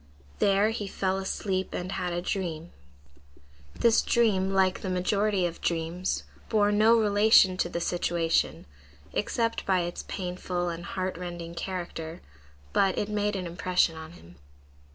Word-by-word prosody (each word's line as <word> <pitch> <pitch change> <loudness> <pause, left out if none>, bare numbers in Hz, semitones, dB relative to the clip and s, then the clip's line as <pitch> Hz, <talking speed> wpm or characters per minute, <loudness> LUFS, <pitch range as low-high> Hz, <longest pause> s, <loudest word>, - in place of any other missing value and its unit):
There 200 +2 +3
he 215 -3 -4
fell 190 0 -1
asleep 190 -1 -2
and 180 +1 -4
had 180 -2 -2
a 175 0 -2
dream. 175 -4 -3 1.0
This 230 -1 +4
dream, 205 -5 +2
like 190 -1 +2
the 190 - -3
majority 195 +1 +1
of 170 -1 -4
dreams, 170 +2 -1 0.3
bore 205 -2 +3
no 220 +3 +5
relation 205 -2 +5
to 175 - 0
the 170 - -3
situation, 170 -1 0 0.5
except 230 -1 -1
by 185 -2 +3
its 175 0 -4
painful 180 -1 -3
and 170 0 -6
heart 185 -2 -3
rending 175 -2 -6
character, 170 -2 -5 0.5
but 195 -1 +2
it 210 - -1
made 210 0 0
an 185 -2 -3
impression 175 0 +1
on 160 +1 -9
him. 85 - -16
185 Hz, 145 wpm, -28 LUFS, 175-200 Hz, 1.0 s, no